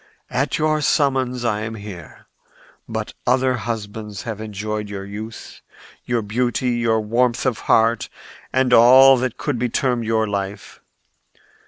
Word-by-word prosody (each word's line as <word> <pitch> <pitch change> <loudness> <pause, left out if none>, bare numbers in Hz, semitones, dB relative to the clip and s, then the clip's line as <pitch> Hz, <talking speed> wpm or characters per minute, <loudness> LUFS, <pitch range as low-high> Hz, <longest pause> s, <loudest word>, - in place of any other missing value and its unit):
At 135 +2 0
your 155 0 +1
summons 130 -4 +1
I 105 -3 0
am 110 +1 -5
here. 100 -6 -10 0.6
But - - -4
other 130 +1 +3
husbands 110 -3 -5
have 110 -2 -5
enjoyed 105 0 -4
your 100 -1 -6
youth, 105 +2 -9 0.4
your 120 -2 -1
beauty, 120 +3 -1
your 115 -2 +1
warmth 120 +3 0
of 130 -4 0
heart 115 0 +3 0.4
and 130 -1 +2
all 130 +3 +8
that 125 -1 -2
could 145 -5 -2
be 125 +1 0
termed 120 -1 0
your 110 0 +1
life. 100 -1 -5
115 Hz, 140 wpm, -21 LUFS, 105-125 Hz, 0.6 s, all